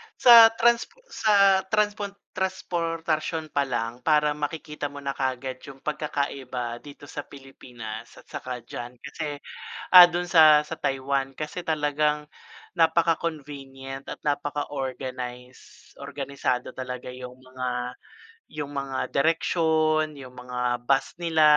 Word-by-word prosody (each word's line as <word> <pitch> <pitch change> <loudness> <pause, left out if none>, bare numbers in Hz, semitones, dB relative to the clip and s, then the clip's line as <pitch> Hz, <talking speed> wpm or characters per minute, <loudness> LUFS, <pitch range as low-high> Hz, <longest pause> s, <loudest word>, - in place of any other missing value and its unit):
sa 235 -2 +10
trans 235 0 +3 0.3
sa 200 -3 +4
transpon 210 0 0 0.2
trasportasyon 165 -4 -2
pa 140 -1 0
lang, 120 -1 -3
parang 150 +2 +2
makikita 150 0 -4
mo 145 0 -10
na 140 - -1
kaagad 130 -1 -3
yung 135 -1 -12
pagkakaiba 135 -5 -3
dito 145 +1 -13
sa 145 0 -7
Pilipinas 120 -5 -9
at - - -15
saka 125 -2 -7
diyan. 120 +1 -8
Kasi, 145 +3 -6 0.6
ah, 180 - +14
dun 175 0 0
sa 155 -3 +7
sa 150 +2 -6
Taiwan, 135 -1 -1
kasi 155 +5 -6
talagang 150 -1 0 0.5
napaka-convenient 145 -5 -1
at - - -10
napaka-organize. 130 -4 -5
Organisado 140 -3 -3
talaga 125 -1 -6
yung 125 0 -9
mga 125 -1 -4 0.6
yung 145 -2 -5
mga 135 -1 -2
direksyon, 155 0 +2
yung 130 -2 -11
mga 125 -1 -2
bus 135 +2 +1
nila, 160 -2 +3
145 Hz, 115 wpm, -26 LUFS, 130-160 Hz, 0.6 s, ah